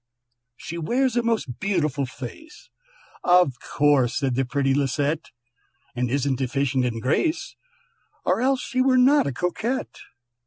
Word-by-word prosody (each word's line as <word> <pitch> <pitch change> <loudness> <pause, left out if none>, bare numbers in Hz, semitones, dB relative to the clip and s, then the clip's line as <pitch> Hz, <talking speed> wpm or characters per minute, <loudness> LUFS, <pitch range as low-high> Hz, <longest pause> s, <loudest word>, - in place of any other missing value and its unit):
"She 170 +1 -6
wears 245 +9 0
a 240 - +3
most 225 - -2
beautiful 150 -9 0
face," 135 - -11 0.5
("Of 180 -6 +4
course!" 145 -4 +2
said 135 -3 0
the 135 +2 +1
pretty 135 +1 0
Lisette), 145 +3 -1 0.7
"And 125 0 -1
isn't 135 0 0
deficient 130 0 0
in 115 -2 -2
grace, 315 - -1 0.7
Or - - +1
else 265 0 +2
she 255 - -1
were 255 0 +4
not 270 - +5
a - - -1
Coquette. 210 - -3
145 Hz, 140 wpm, -24 LUFS, -, 0.7 s, not